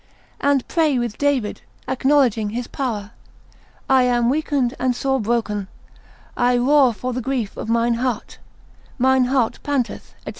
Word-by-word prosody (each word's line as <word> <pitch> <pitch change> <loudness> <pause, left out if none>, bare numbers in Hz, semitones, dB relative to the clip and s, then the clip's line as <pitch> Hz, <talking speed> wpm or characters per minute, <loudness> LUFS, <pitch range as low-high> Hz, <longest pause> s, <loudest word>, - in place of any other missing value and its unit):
And 280 -2 +1
pray 315 -6 +2
with 240 -3 -3
David, 275 -7 0 0.3
acknowledging 260 -5 +2
his 240 +3 -4
power, 225 -7 -4 0.8
I 265 -1 +5
am 240 -1 +2
weakened 280 -4 0
and 250 -1 +1
sore 265 +2 0
broken, 210 -3 -1 0.7
I 245 0 +2
roar 265 +1 +4
for 250 +3 -4
the 255 - -3
grief 245 -4 -2
of - - -6
mine 235 +1 +2
heart, 250 -3 -3 0.6
mine 260 0 +3
heart 250 -3 0
panteth, 275 -5 -3
&c. - - -5
250 Hz, 145 wpm, -21 LUFS, 235-270 Hz, 0.8 s, I